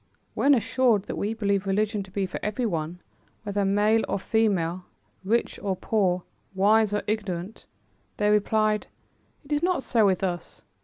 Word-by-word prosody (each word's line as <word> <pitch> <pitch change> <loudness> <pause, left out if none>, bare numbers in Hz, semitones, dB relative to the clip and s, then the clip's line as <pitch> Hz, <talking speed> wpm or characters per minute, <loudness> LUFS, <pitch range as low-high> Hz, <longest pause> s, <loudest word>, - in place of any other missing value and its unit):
When 285 0 +4
assured 235 -3 +2
that - - -5
we 215 +2 -2
believe 200 -3 0
religion 210 +2 0
to 190 - -10
be 195 +1 -1
for 185 - -5
everyone, 180 -7 -2 0.4
whether 205 -1 -1
male 210 +3 +3
or - - 0
female, 185 -5 0 0.4
rich 230 +5 0
or 195 -2 -2
poor, 185 -3 0 0.3
wise 210 +2 +4
or 210 - -1
ignorant, 205 -2 -4 0.5
they 210 0 +2
replied: 215 0 +2 0.6
"It 280 - -15
is 295 0 +1
not 355 -5 +1
so 225 -4 +3
with 190 0 +1
us. 175 -3 -4
205 Hz, 155 wpm, -26 LUFS, 190-220 Hz, 0.6 s, When